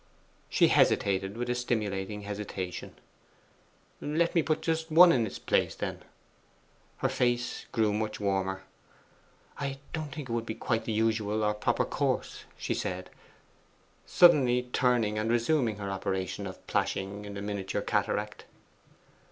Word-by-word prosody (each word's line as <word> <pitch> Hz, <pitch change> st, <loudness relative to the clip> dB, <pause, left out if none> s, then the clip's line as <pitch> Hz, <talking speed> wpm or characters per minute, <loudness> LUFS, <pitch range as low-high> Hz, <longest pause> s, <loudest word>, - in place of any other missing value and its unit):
She -, -, +4 dB
hesitated 95 Hz, +1 st, +2 dB
with 120 Hz, +1 st, -2 dB
a 125 Hz, -, +1 dB
stimulating 105 Hz, -4 st, -2 dB
hesitation. 100 Hz, -3 st, -5 dB, 1.1 s
'Let 165 Hz, +3 st, +1 dB
me 170 Hz, -, +4 dB
put 155 Hz, 0 st, -1 dB
just 160 Hz, 0 st, -1 dB
one 170 Hz, +2 st, +8 dB
in 120 Hz, -6 st, +2 dB
its -, -, -7 dB
place, -, -, +1 dB
then?' -, -, -4 dB, 1.0 s
Her -, -, +6 dB
face 120 Hz, 0 st, -1 dB
grew 110 Hz, -2 st, +2 dB
much 110 Hz, 0 st, -2 dB
warmer. 95 Hz, -1 st, -1 dB, 1.0 s
'I 140 Hz, -1 st, -3 dB, 0.2 s
don't 155 Hz, -3 st, -4 dB
think 145 Hz, -1 st, -6 dB
it 115 Hz, -, -4 dB
would 115 Hz, -1 st, 0 dB
be 110 Hz, -, -3 dB
quite 115 Hz, -2 st, -1 dB
the -, -, -2 dB
usual 110 Hz, -1 st, +1 dB
or 105 Hz, 0 st, +2 dB
proper 105 Hz, -, 0 dB
course,' -, -, -2 dB
she -, -, -2 dB
said, 90 Hz, 0 st, -4 dB, 0.9 s
suddenly 125 Hz, -8 st, +5 dB
turning 115 Hz, -4 st, +2 dB
and 110 Hz, +1 st, -1 dB
resuming 120 Hz, 0 st, +2 dB
her 100 Hz, -1 st, -5 dB
operation 95 Hz, +1 st, -3 dB
of 95 Hz, -, -10 dB
plashing 100 Hz, +2 st, -2 dB
in 100 Hz, 0 st, -7 dB
the 100 Hz, -, -5 dB
miniature 100 Hz, -2 st, -3 dB
cataract. 105 Hz, 0 st, -1 dB
110 Hz, 145 wpm, -29 LUFS, 100-125 Hz, 1.1 s, one